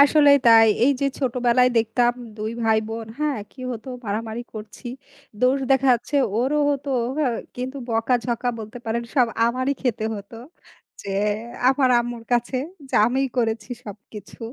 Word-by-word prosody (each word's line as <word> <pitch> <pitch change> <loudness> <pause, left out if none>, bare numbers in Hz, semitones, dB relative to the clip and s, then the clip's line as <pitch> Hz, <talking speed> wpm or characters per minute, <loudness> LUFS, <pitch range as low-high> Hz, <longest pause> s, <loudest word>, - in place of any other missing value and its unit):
আসলেই 285 0 +7
তাই। 225 -1 +8 0.2
এই 280 - +5
যে, 280 - +2
ছোটবেলায় 250 -1 +3
দেখতাম 230 +2 +2 0.2
২ 215 0 -3
ভাই 220 -1 +4
বোন 225 0 -5
হ্যাঁ, 300 -4 0
কি 265 - -14
হতো 235 +3 -8 0.2
মারামারি 220 +3 -3
করছি। 215 +3 -9 0.5
দোষ 255 +2 +3
দেখা 270 0 +4
যাচ্ছে 240 +5 -3 0.2
ওরও 270 +5 +1
হতো 280 0 -3 0.3
হ্যাঁ, 260 -6 +1 0.2
কিন্তু 255 +2 -4
বকাঝকা 235 +1 0
বলতে 220 +2 -8
পারেন 230 +1 -1
সব 255 -4 +4 0.2
আমারই 255 +3 0
খেতে 235 -4 -1
হত। 200 0 -10 0.7
যে, - - -8 0.6
আমার 265 0 +3
আম্মুর 240 -1 -5
কাছে 240 +2 +1 0.3
যে, - - -6
আমিই 265 +2 0
করেছি 225 -2 -1
সবকিছু। 210 0 -11
240 Hz, 150 wpm, -23 LUFS, 225-260 Hz, 0.7 s, তাই